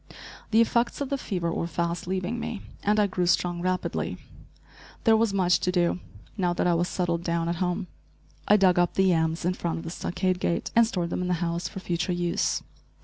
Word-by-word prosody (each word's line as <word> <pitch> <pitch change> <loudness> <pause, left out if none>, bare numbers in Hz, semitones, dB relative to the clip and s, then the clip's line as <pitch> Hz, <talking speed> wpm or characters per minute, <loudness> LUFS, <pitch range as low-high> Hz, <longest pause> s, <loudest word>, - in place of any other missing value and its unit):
The 225 +1 +5
effects 235 +1 +1
of 280 -2 -2
the 280 - 0
fever 175 -8 -2
were 170 - -2
fast 170 +1 -2
leaving 190 +5 -2
me, 220 -3 -5 0.2
and 210 +1 +2
I 210 - +5
grew 180 -2 -1
strong 175 -1 +1
rapidly. 185 0 -1 0.9
There 225 -1 +6
was 220 -1 +2
much 185 -2 +3
to 180 - 0
do, 175 -1 +1 0.4
now 180 -4 +1
that 175 - 0
I 175 - +4
was 175 +1 +1
settled 170 -2 -1
down 170 -1 0
at 170 0 -1
home. 180 +2 -1 0.6
I 210 - +6
dug 185 -3 +4
up 175 - +2
the 190 - +3
yams 165 -2 +1
in 180 - +2
front 170 -2 -3
of 165 - -6
the 165 - -5
stockade 185 +1 -1
gate 170 - -1
and 230 -1 +6
stored 175 -6 -2
them - - -1
in 180 - -1
the 180 - +1
house 170 0 -2
for 195 - -7
future 175 0 -1
use. 175 +2 0
180 Hz, 215 wpm, -26 LUFS, 170-195 Hz, 0.9 s, There